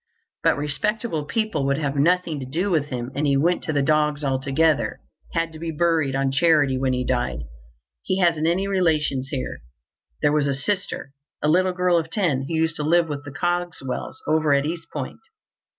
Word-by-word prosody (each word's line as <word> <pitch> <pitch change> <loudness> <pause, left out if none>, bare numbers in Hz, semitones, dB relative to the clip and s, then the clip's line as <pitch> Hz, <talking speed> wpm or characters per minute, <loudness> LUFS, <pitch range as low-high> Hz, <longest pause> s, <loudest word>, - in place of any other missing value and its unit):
But - - +3
respectable 155 - -1
people 215 -6 -1
would 140 0 +1
have 145 -2 -2
nothing 165 +1 +2
to 130 - -5
do 175 +9 -1
with 155 -4 +2
him, 125 -3 -5
and 145 +1 0
he 140 -1 +3
went 175 +5 +1
to - - -1
the 145 -2 +1
dogs 150 0 +2
altogether—had 145 +4 -1
to 160 - -10
be 165 0 -4
buried 160 -4 +1
on 135 0 +1
charity 145 -2 +3
when 130 0 0
he 125 0 -1
died. 120 - -1 0.6
He 185 - -1
hasn't 165 -4 +2
any 185 +4 +1
relations 155 -8 +1
here. 135 -3 -4 0.6
There 145 - +4
was 150 -2 +2
a 140 - +1
sister, 185 -2 -2 0.3
a - - +3
little 185 +3 +3
girl 180 -1 +2
of 165 0 -5
ten, 160 -10 0
who 165 - -2
used 160 0 +1
to 150 - -2
live 165 +2 +3
with 145 -1 -4
the 145 - -7
Cogswells 175 -4 -3
over 155 -1 +3
at 140 +1 +1
East 165 +1 -4
Point. 140 -4 -5
155 Hz, 190 wpm, -23 LUFS, 140-170 Hz, 0.6 s, There